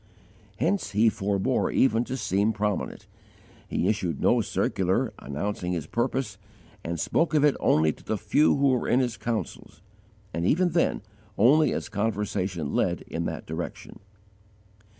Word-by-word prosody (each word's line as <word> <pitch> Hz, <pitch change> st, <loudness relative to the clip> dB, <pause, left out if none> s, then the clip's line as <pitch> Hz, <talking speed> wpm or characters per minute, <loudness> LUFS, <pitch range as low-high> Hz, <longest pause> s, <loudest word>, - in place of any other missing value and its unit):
Hence 170 Hz, -, 0 dB
he 110 Hz, +3 st, +5 dB
forbore 100 Hz, +6 st, 0 dB
even 115 Hz, -3 st, +3 dB
to 130 Hz, -, -4 dB
seem 105 Hz, -1 st, +1 dB
prominent: 105 Hz, -1 st, -2 dB, 0.6 s
he -, -, -1 dB
issued -, -, -1 dB
no -, -, +3 dB
circular, -, -, 0 dB
announcing 90 Hz, +5 st, -3 dB
his 80 Hz, -4 st, -3 dB
purpose, 120 Hz, -, -2 dB, 0.4 s
and 85 Hz, 0 st, -3 dB
spoke 165 Hz, -, +1 dB
of 150 Hz, -1 st, +4 dB
it 145 Hz, -, +4 dB
only 80 Hz, 0 st, +3 dB
to -, -, -19 dB
the 110 Hz, -, -2 dB
few 110 Hz, +9 st, +3 dB
who 140 Hz, 0 st, +3 dB
were 125 Hz, -2 st, +1 dB
in 125 Hz, -, +3 dB
his 125 Hz, -3 st, 0 dB
councils, 115 Hz, -4 st, -5 dB, 0.5 s
and 85 Hz, -, -2 dB
even 175 Hz, -, +3 dB
then 165 Hz, -, +1 dB, 0.3 s
only 145 Hz, +8 st, +5 dB
as -, -, -3 dB
conversation 100 Hz, -6 st, -2 dB
led -, -, +1 dB
in -, -, -4 dB
that -, -, -4 dB
direction. 80 Hz, +2 st, -6 dB
110 Hz, 150 wpm, -26 LUFS, 95-130 Hz, 0.6 s, he